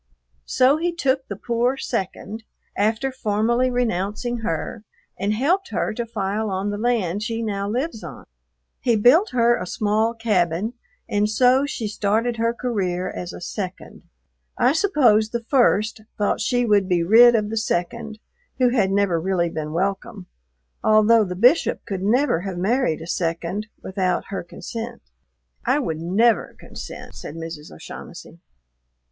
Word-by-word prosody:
So 265 +4 +4
he 345 +2 0
took 270 -5 0
the 200 - -5
poor 240 +5 0
"second," 220 -1 -4 0.3
after 220 +6 0
formally 235 +1 +1
renouncing 240 0 -1
her, 210 0 -4 0.3
and 200 +2 -1
helped 335 - +1
her - - -1
to 235 +1 -4
file 215 0 -2
on 195 +1 -2
the 205 - -4
land 210 -5 0
she 230 +1 -2
now 200 -2 -2
lives 245 +1 -3
on. - - -9 0.5
He 240 -3 +2
built 255 - +5
her 240 -1 +3
a 180 - -5
small 215 +4 0
cabin, 205 -2 0 0.3
and 205 +1 +1
so 255 +5 +4
she 235 -6 -3
started 220 +3 0
her 230 +1 +1
career 195 -7 -2
as 175 0 -6
a - - -9
"second." 185 +1 -6 0.6
I 250 +3 +4
suppose 265 - +3
the 235 +1 -3
"first" 225 -4 +2 0.2
thought 205 0 0
she 245 +3 +1
would 205 -3 +3
be 175 -2 +2
rid 235 +6 +7
of 210 -1 0
the - - -2
second, 220 +2 -2 0.4
who 255 -1 +4
had 220 -6 +2
never 195 -4 +1
really 175 -1 0
been 155 -1 -4
welcome, 195 +4 -2 0.6
although 215 +1 +5
the 180 -3 -4
Bishop 245 - +3
could 195 -4 -4
never 225 - +2
have 190 -1 -5
married 195 - +1
a - - -8
"second" 170 +5 -2 0.2
without 185 -2 -1
her 195 - -3
consent. 230 +6 -7 0.6
"I 265 - +2
would 165 - -2
never 205 +8 +2
consent," - - -9
said 150 - -8
Mrs. 165 -2 -7
O'Shaughnessy. - - -10
215 Hz, 150 wpm, -22 LUFS, 190-240 Hz, 0.6 s, rid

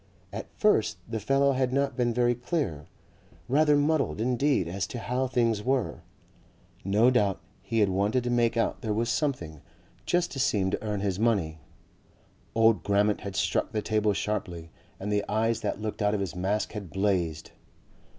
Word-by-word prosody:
At 110 - -5
first 110 - +2
the 115 0 -3
fellow 135 +6 +2
had 130 -1 0
not 140 -1 0
been 120 -1 +1
very 120 +1 +2
clear, 120 - -3 0.6
rather 145 +3 +4
muddled 145 -4 +1
indeed 125 - +1
as 95 +3 -3
to - - -6
how 125 +3 -1
things 115 -4 +1
were 130 +1 -1 0.8
no 105 +6 +4
doubt 105 -6 +2 0.2
he 110 +3 0
had 100 - +4
wanted 100 +6 +1
to 120 - -1
make 120 -1 +2
out 115 - 0
there 110 -2 -1
was 115 +2 0
something 85 - -2 0.5
just 175 0 +1
to 135 - -5
seem 105 -8 +1
to - - -3
earn 105 -2 -2
his 95 -2 -1
money. 95 -9 +1 1.0
Old 115 -1 +4
Grammont 100 +1 +1
had 100 -1 -6
struck 85 +7 0
the 105 -1 -1
table 105 -1 +1
sharply 90 -6 -3 0.3
and 100 +2 -3
the 105 0 +1
eyes 115 +2 +1
that 105 -2 -2
looked 110 0 -4
out 105 0 +2
of - - -1
his 95 -4 -3
mask 95 +4 -1
had 105 -4 -7
blazed. 95 -5 -1
110 Hz, 175 wpm, -27 LUFS, 100-125 Hz, 1.0 s, rather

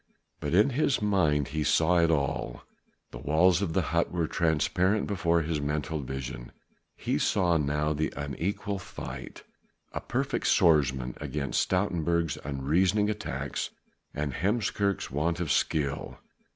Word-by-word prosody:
But 75 +3 -1
in 105 +8 +5
his 140 +1 +1
mind 80 - +2
he 75 +1 -1
saw 85 +4 +3
it 85 -1 +4
all: 70 -5 -1 0.5
the - - -8
walls 80 +6 +3
of 90 -5 -1
the - - +2
hut - - +2
were 85 -2 0
transparent 90 +6 +1
before 85 -4 +1
his 80 -1 -2
mental 75 +2 -2
vision, 65 -3 -6 0.4
he - - -1
saw 85 -3 +2
now 75 +1 0
the 80 +1 -1
unequal 85 +8 -3
fight; - - -8 0.5
a - - -3
perfect - - -1
swordsman 65 -6 +3
against 70 -3 -1
Stoutenburg's 85 -4 0
unreasoning 85 +10 +1
attacks 105 0 -4 0.4
and 75 -2 -3
Heemskerk's 100 - 0
want 80 +5 0
of 85 -5 -1
skill. 70 -2 0
80 Hz, 135 wpm, -28 LUFS, 75-90 Hz, 0.5 s, in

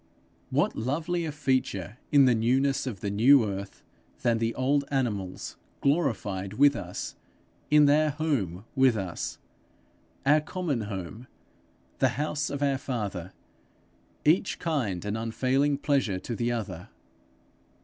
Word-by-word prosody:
What - - +1
lovelier 160 +7 -1
feature 130 - -1
in 140 -2 +7
the 125 - +5
newness 130 +5 +1
of 105 -8 -5
the 100 - -2
new 120 +4 +6
earth, 100 -1 -6 0.4
than 115 -2 +2
the 115 0 -1
old 140 +2 +2
animals 105 -9 -2 0.2
glorified 110 - 0
with 140 +5 +5
us, - - -5 0.5
in 150 0 +6
their 150 +2 +4
home 130 - -2
with 130 -4 +4
us 95 -4 -4 0.9
our 150 +2 +5
common 155 -5 -2
home, 100 +5 -6 0.7
the - - +4
house 150 0 -1
of 140 0 -3
our 140 -2 +1
father 100 -9 -4 0.9
each 170 +6 +3
kind 120 - -2
an 105 +1 -2
unfailing 130 +5 +1
pleasure 135 -9 +1
to 115 +5 -5
the 120 +1 0
other! 100 -7 -4
130 Hz, 130 wpm, -28 LUFS, 105-145 Hz, 0.9 s, in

